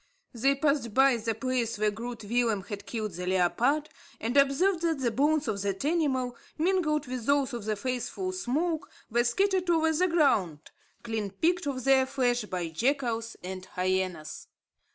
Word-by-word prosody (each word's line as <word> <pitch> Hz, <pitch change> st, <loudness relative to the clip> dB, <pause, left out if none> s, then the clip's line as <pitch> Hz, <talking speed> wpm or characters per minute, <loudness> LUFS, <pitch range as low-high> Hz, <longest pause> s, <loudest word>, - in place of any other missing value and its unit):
They 270 Hz, +4 st, +2 dB
passed 275 Hz, -6 st, 0 dB
by 270 Hz, -2 st, +5 dB
the 225 Hz, 0 st, -2 dB
place 245 Hz, -1 st, -1 dB
where 210 Hz, 0 st, +2 dB
Groot 230 Hz, +1 st, -6 dB
Willem 225 Hz, -2 st, 0 dB
had 205 Hz, 0 st, -7 dB
killed 215 Hz, -3 st, -3 dB
the 180 Hz, +1 st, -6 dB
leopard, 235 Hz, -, +2 dB, 0.3 s
and 230 Hz, +4 st, -2 dB
observed 320 Hz, +7 st, +3 dB
that 330 Hz, -2 st, +1 dB
the 250 Hz, -3 st, 0 dB
bones 295 Hz, +4 st, +2 dB
of 205 Hz, -3 st, -1 dB
that 200 Hz, +4 st, -2 dB
animal, 270 Hz, -6 st, 0 dB, 0.2 s
mingled 315 Hz, -3 st, +1 dB
with 250 Hz, -3 st, -5 dB
those 280 Hz, -2 st, +2 dB
of 235 Hz, -4 st, -5 dB
the 215 Hz, 0 st, 0 dB
faithful 255 Hz, -, -3 dB
Smoke, 330 Hz, -1 st, -1 dB, 0.2 s
were 240 Hz, +1 st, +3 dB
scattered 370 Hz, +8 st, +1 dB
over 320 Hz, -1 st, +3 dB
the 360 Hz, +4 st, +2 dB
ground, 205 Hz, -, +1 dB, 0.3 s
clean 220 Hz, -3 st, -3 dB
picked 325 Hz, -, 0 dB
of 260 Hz, -3 st, -3 dB
their 265 Hz, 0 st, +4 dB
flesh 245 Hz, -4 st, 0 dB
by 185 Hz, -3 st, -3 dB
the 165 Hz, -, -5 dB
jackals 235 Hz, -, -1 dB
and 185 Hz, 0 st, -6 dB
hyenas. 185 Hz, -4 st, -2 dB
250 Hz, 170 wpm, -28 LUFS, 215-295 Hz, 0.3 s, by